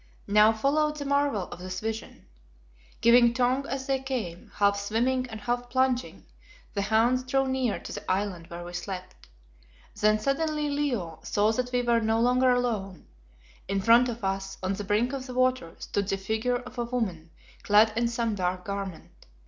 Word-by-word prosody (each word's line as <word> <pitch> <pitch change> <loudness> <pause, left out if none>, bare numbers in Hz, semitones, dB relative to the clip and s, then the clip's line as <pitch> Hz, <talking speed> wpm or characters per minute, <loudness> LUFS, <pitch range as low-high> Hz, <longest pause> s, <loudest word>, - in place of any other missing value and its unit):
Now 210 +2 +5
followed 300 +7 +1
the 290 -1 -5
marvel 280 -7 +1
of - - -9
this 185 0 -5
vision. 220 0 -6 0.8
Giving 235 0 +6
tongue 255 +2 +1
as 265 0 -3
they 270 -1 0
came, 235 -11 -5
half 200 0 +3
swimming 245 +5 0
and 220 -1 -7
half 245 +2 -2
plunging, 260 0 0 0.5
the 200 - -1
hounds 225 +5 +2
drew 270 +1 +1
near 260 -4 0
to - - -8
the - - -4
island 185 -3 -2
where 175 0 -7
we 175 0 -9
slept. 185 +1 -7 0.7
Then, 215 0 +3
suddenly 300 +5 -1
Leo 245 - -2
saw 210 +1 +1
that 245 +2 -2
we 245 0 +1
were 235 -1 +3
no 220 0 +1
longer 250 +2 +3
alone. 220 -7 -1 0.6
In 195 0 0
front 230 +5 +5
of 235 -2 -6
us, 195 0 -2
on 185 +1 0
the 205 - -4
brink 215 +6 +1
of 265 -1 -5
the 250 - -7
water, 255 -9 +1
stood 200 -1 -3
the 195 - 0
figure 220 +5 -1
of 250 0 -9
a 240 - 0
woman 200 -10 -3 0.3
clad 215 0 +5
in 235 +1 +1
some 230 -1 -1
dark 185 -2 -2
garment. 200 -3 -7
230 Hz, 180 wpm, -27 LUFS, 200-255 Hz, 0.8 s, Giving